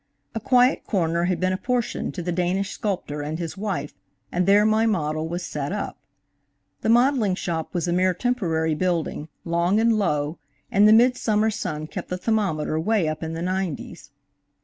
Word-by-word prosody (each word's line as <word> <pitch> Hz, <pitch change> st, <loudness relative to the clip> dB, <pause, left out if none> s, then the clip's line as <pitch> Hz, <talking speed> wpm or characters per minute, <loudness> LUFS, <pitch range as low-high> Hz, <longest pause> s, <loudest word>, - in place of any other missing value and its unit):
A 225 Hz, -, -2 dB
quiet 250 Hz, +2 st, +3 dB
corner 170 Hz, -4 st, +1 dB
had 180 Hz, -1 st, 0 dB
been 185 Hz, 0 st, +1 dB
apportioned 245 Hz, +5 st, -2 dB
to 180 Hz, -, -4 dB
the 175 Hz, -, -2 dB
Danish 185 Hz, +3 st, 0 dB
sculptor 185 Hz, -9 st, -3 dB
and 150 Hz, +2 st, -3 dB
his 165 Hz, -2 st, -5 dB
wife, 190 Hz, -8 st, -3 dB, 0.4 s
and 180 Hz, +1 st, 0 dB
there 205 Hz, +1 st, +6 dB
my 220 Hz, +1 st, +3 dB
model 155 Hz, -6 st, -1 dB
was 175 Hz, +2 st, -4 dB
set 145 Hz, -1 st, -4 dB
up. 205 Hz, 0 st, -3 dB, 0.9 s
The -, -, -1 dB
modeling 240 Hz, -4 st, +3 dB
shop 165 Hz, -2 st, -4 dB
was 175 Hz, 0 st, 0 dB
a 175 Hz, -, +1 dB
mere 185 Hz, 0 st, +2 dB
temporary 170 Hz, -9 st, 0 dB
building, 165 Hz, -2 st, -1 dB, 0.2 s
long 170 Hz, +4 st, +2 dB
and 230 Hz, +1 st, +4 dB
low, 150 Hz, -7 st, 0 dB, 0.3 s
and 205 Hz, +2 st, +5 dB
the -, -, +7 dB
midsummer 220 Hz, -2 st, +4 dB
sun 155 Hz, -6 st, -4 dB
kept -, -, -7 dB
the 180 Hz, -, -2 dB
thermometer 180 Hz, -7 st, 0 dB
way 200 Hz, 0 st, +1 dB
up 155 Hz, 0 st, -3 dB
in 160 Hz, 0 st, -4 dB
the 165 Hz, +1 st, -4 dB
nineties. 180 Hz, -3 st, -4 dB
180 Hz, 175 wpm, -24 LUFS, 160-215 Hz, 0.9 s, the